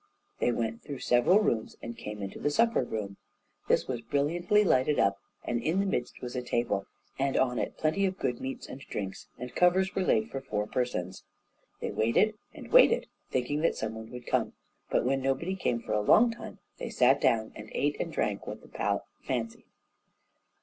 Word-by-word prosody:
They 120 - +2
went 115 -1 -2
through 140 - -6
several 125 - +4
rooms, 115 - 0
and 115 0 -7
came 105 -2 -6
into 95 - -6
the 145 - +1
supper 230 +8 +3
room. 105 -5 -4 0.5
This - - +2
was 125 -3 -3
brilliantly 170 - +2
lighted 145 -4 +3
up, 100 0 +2 0.2
and 120 -1 -1
in 160 +9 +1
the 200 - +2
midst 125 -12 -2
was 125 0 -5
a 125 - -1
table, 120 -5 -1 0.3
and 135 0 +1
on 125 -2 +2
it - - -3
plenty 175 +6 +2
of 190 0 -4
good 125 -8 -2
meats 135 0 -5
and 130 - -8
drinks, 95 -7 -5
and 125 0 -7
covers 185 +2 +3
were 195 - 0
laid 220 +4 +2
for 135 - -4
four 105 -6 -2
persons. 95 -7 -2 0.6
They - - -2
waited 115 - +3 0.2
and - - -11
waited, - - +6 0.2
thinking 135 +4 -1
that 165 - +2
some 110 0 -3
one 110 0 -8
would 125 -1 -9
come: - - 0 0.4
but - - +1
when 135 +1 +1
nobody 135 +8 0
came 120 -10 0
for - - -4
a 105 - +2
long 230 - +6
time, 225 -1 -9 0.2
they - - -4
sat 130 +2 +4
down 110 -1 +2
and 105 0 -9
ate 145 +1 +1
and - - -2
drank - - -1
what - - -6
the - - -15
palate - - -1 0.2
fancied. 115 -3 -3
125 Hz, 200 wpm, -29 LUFS, 115-170 Hz, 0.6 s, waited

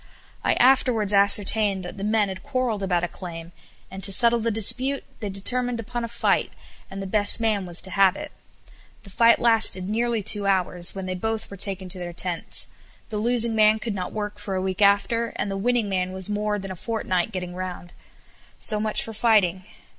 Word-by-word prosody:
I - - +1
afterwards 245 -5 +2
ascertained 200 -1 +3
that 185 +3 -9
the - - -6
men 215 0 +1
had 190 -1 -8
quarrelled 255 -6 -3
about 180 -3 -1
a - - -1
claim, 170 -2 -10 0.4
and 190 0 -9
to 200 - +3
settle 235 +3 +3
the 230 +1 -2
dispute 255 +6 +3 0.2
they 210 - -5
determined 245 +5 -1
upon 240 +1 -6
a - - -3
fight, 235 - -1 0.4
and 195 - -8
the 195 - -6
best 205 +2 +3
man 215 -4 -1
was 175 0 +3
to 190 - -4
have 190 +1 +3
it. - - -9 0.7
The 195 - -15
fight 230 +3 +4
lasted 220 -5 +4
nearly 230 +1 -2
two 205 0 +5
hours, 180 -2 +4
when 190 -1 -6
they 185 - -4
both 220 +4 -4
were - - -8
taken 190 -1 -1
to 185 0 -2
their 175 -1 -7
tents 175 -1 -4 0.4
the 215 - -5
losing 235 +1 0
man 215 0 +3
could 220 0 -5
not 185 -2 -5
work 210 -1 -6
for 205 -2 -5
a - - -1
week 190 +1 -4
after, 205 +4 +1
and 200 - -4
the - - -4
winning 235 +2 -1
man 185 -1 -3
was 190 +2 -2
more 210 0 -2
than 195 -1 -8
a - - -7
fortnight 185 -2 -3
getting 180 -3 -6
round. 180 -1 -8 0.6
So 215 -1 +3
much 215 0 0
for 225 - -8
fighting. 205 -5 +1
205 Hz, 205 wpm, -23 LUFS, 190-225 Hz, 0.7 s, two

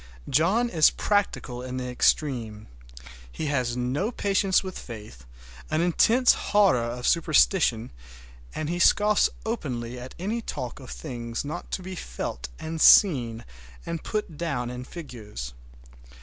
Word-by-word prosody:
John 185 - +2
is 160 -9 +5
practical 195 -11 -1
in 130 0 -5
the 125 0 -3
extreme. 120 -4 0 0.7
He 155 - -5
has 125 -3 -1
no 130 - -1
patience 195 -4 +1
with 185 -1 -6
faith, 105 - -10 0.4
an 155 +1 +1
intense 225 +9 +4
horror 200 -10 +3
of 120 +1 -4
superstition, 155 - +3 0.6
and 155 - -3
he 175 +2 -2
scoffs 210 +4 +4 0.2
openly 125 - -4
at 125 +1 -9
any 215 +6 -2
talk 125 - -6
of 130 - -11
things 120 -4 -5
not 155 +4 -6
to 185 - -2
be 185 +1 -6
felt 60 - -5
and 160 0 -5
seen 120 - +5 0.4
and 170 -2 -4
put 210 -8 -3
down 130 -8 -2
in 125 0 -7
figures. 110 - -8
145 Hz, 135 wpm, -26 LUFS, 120-185 Hz, 0.7 s, is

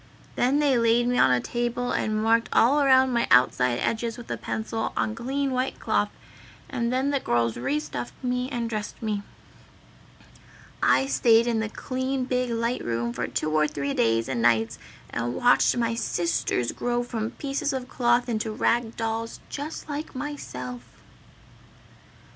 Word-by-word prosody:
Then 255 +4 +2
they 285 -4 +3
laid 230 +1 +3
me 245 0 +1
on - - +6
a 125 -1 +3
table 240 - -2
and 215 0 0
marked 230 +1 +3
all 275 +6 +4
around 260 -2 +5
my 235 -1 +1
outside 125 0 +4
edges 230 - -1
with 240 - -9
a - - 0
pencil 220 0 -3
on 220 - 0
clean 270 +4 -2
white 255 +1 -1
cloth, - - +1 0.6
and 235 -3 -2
then 265 +3 +1
the 280 - +1
girls 115 - 0
re 135 +5 -1
stuffed 120 -5 -6
me 250 0 -1
and 240 -4 -2
dressed 215 -2 -5
me. 210 -2 -1 1.6
"I 270 - +4
stayed 235 -4 +4
in 235 -2 +1
the 220 -1 -2
clean 260 +2 -2
big 250 -1 0
light 235 +1 -1
room 120 0 -2
for - - -2
two 155 - -2
or 155 0 +3
three 140 -1 -3
days 115 0 +2
and 125 -3 -2
nights 115 -1 +2 0.3
and 120 +1 -2
watched 245 0 +4
my 230 -1 +1
Sisters 170 - -1
grow 240 0 -1
from 225 -2 -3
pieces 285 +1 -2
of 260 -2 -4
cloth 240 -1 +2
into 220 -2 -2
rag 230 +1 0
dolls 225 0 -3
just 295 +3 -6
like 295 -1 -5
myself!" 125 - -6
230 Hz, 165 wpm, -26 LUFS, 155-255 Hz, 1.6 s, on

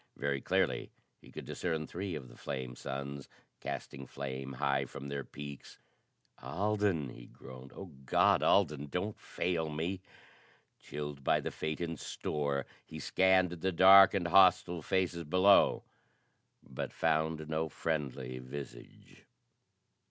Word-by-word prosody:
Very 70 -1 -1
clearly - - 0 0.3
he - - -16
could - - -8
discern 80 -3 -2
three 90 +1 -5
of 70 -4 -7
the - - -15
flame 65 -2 -5
suns, 70 +1 -6 0.3
casting 65 -1 -6
flame 65 0 -6
high 70 +1 0
from 70 +1 -8
their 70 -1 -3
peaks. 70 0 -10 0.6
"Alden!" 100 -6 0
he - - -11
groaned. 65 0 -12
"Oh 95 -3 -9
God, 65 - +4
Alden, 75 -7 +2
don't 90 +8 -3
fail 80 -3 -2
me!" 85 +5 -3 0.8
Chilled 75 -2 -6
by - - +3
the - - -4
fate 80 +2 -4
in 85 -2 -3
store, 70 -2 -2 0.2
he - - -10
scanned 95 -1 +3
the 90 +2 -2
dark 95 +3 +8
and 90 -3 0
hostile 90 -2 +5
faces 90 0 0
below, 90 +5 +4 0.8
but 65 - -6
found 80 0 0
no 80 0 -1
friendly 65 -5 -3
visage. 65 -1 -10
75 Hz, 130 wpm, -32 LUFS, 70-90 Hz, 0.8 s, dark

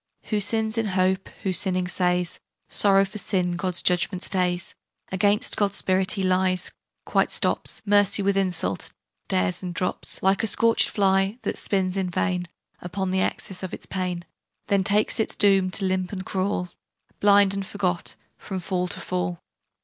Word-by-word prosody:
"Who 210 - +2
sins 220 +2 +2
in 225 - 0
hope, 190 +1 +1
who, 190 - 0
sinning, 185 -1 +3
says, 180 -1 0 0.3
'Sorrow 195 -1 +4
for 210 +2 -8
sin 180 -4 -1
God's 175 0 -1
judgement 180 +1 +1
stays!' 180 -2 -1 0.4
Against 205 +2 +1
God's 200 -2 +1
Spirit 185 0 +1
he 195 - -2
lies; 185 0 +1 0.3
quite - - +2
stops - - 0
Mercy 205 -1 +3
with 200 0 +2
insult; 175 - 0 0.4
dares, 90 0 0
and 180 -2 -5
drops, 180 +1 -2
Like 190 +1 +3
a 225 - 0
scorch'd 230 +2 +3
fly, 195 +1 +2
that - - -2
spins 190 -1 0
in 190 -2 -1
vain 180 0 -1 0.3
Upon 185 +2 -3
the 190 0 +1
axis 185 0 -3
of 185 - -5
its - - -12
pain, 180 -2 -3 0.4
Then 200 -1 +3
takes 210 +3 +1
its 220 - -1
doom, 195 -2 +3
to 195 +1 0
limp 185 -1 -1
and 190 -2 -5
crawl, 185 -1 -1 0.5
Blind 200 -1 +5
and 195 0 -2
forgot, 185 -2 -2 0.2
from 190 -2 -5
fall 180 0 -2
to - - -4
fall." 90 -1 -3
190 Hz, 165 wpm, -24 LUFS, 180-200 Hz, 0.5 s, Blind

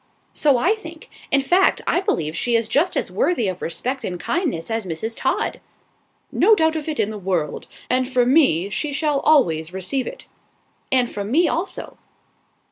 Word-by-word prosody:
"So 285 -4 +3
I 355 - +3
think. 335 -7 -11 0.2
In 275 - +4
fact, 360 +7 +3
I 355 - +1
believe 165 - -1
she 240 +6 0
is 230 -1 +1
just 300 +10 +1
as - - -2
worthy 250 - +1
of 185 -1 -4
respect 255 +10 -3
and 180 -1 -4
kindness 260 - -2
as 225 0 -1
Mrs. 190 +6 -4
Todd." - - -1 0.7
"No 440 - +5
doubt 320 -3 +2
of 315 0 -4
it 305 - -4
in 210 - +1
the 215 - -6
world; 180 -6 -2 0.2
and 255 0 0
from 250 -1 +2
me 200 - +3
she 290 +9 -2
shall 295 0 +1
always 170 - +2
receive 190 +8 -2
it." - - -8 0.7
"And 255 -2 +3
from 205 -2 -5
me 330 +8 +3
also." 340 +5 -4
255 Hz, 180 wpm, -21 LUFS, 195-315 Hz, 0.7 s, No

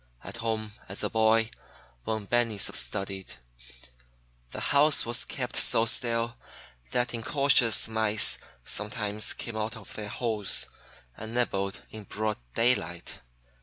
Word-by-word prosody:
At - - -8
home, 110 -2 -2 0.2
as 100 - -3
a - - -1
boy, 110 0 +3 0.5
when 110 -2 -2
Benny 120 -1 +1
studied, 95 +6 -2 1.1
the - - -7
house 145 +1 +4
was 120 +1 +3
kept - - -4
so 115 - +4
still 115 0 +3 0.5
that 120 - 0
incautious 120 -1 +3
mice 110 -1 +2 0.3
sometimes 105 0 -2
came 115 - -6
out 110 +2 -3
of 105 - -11
their 105 -1 -6
holes 110 -5 0 0.5
and 110 +2 -8
nibbled 100 -5 -1
in 110 -2 -9
broad 110 +1 -2 0.2
daylight. 90 -8 0
110 Hz, 125 wpm, -28 LUFS, 105-115 Hz, 1.1 s, house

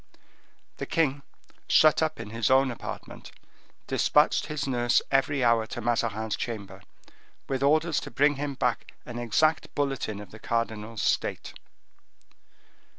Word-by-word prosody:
The - - -5
king, 145 -4 +1 0.5
shut 155 0 +5
up 155 -4 -1
in 110 -2 -7
his 115 -1 0
own 130 0 +4
apartment, 120 - -8 0.6
dispatched - - +2
his 150 -2 -3
nurse 120 -2 +2
every 135 0 +2
hour 115 -2 +3
to - - -6
Mazarin's 110 -2 -1
chamber, 100 -5 -6 0.7
with 135 -1 -2
orders 155 +3 +3
to - - -8
bring 145 0 +2
him 140 -1 -3
back 125 -2 -1
an 120 -1 -6
exact 135 +7 +1
bulletin 135 -7 -2
of 105 -2 -11
the 110 - -12
cardinal's 115 -1 -3
state. - - -1
120 Hz, 135 wpm, -27 LUFS, 115-140 Hz, 0.7 s, shut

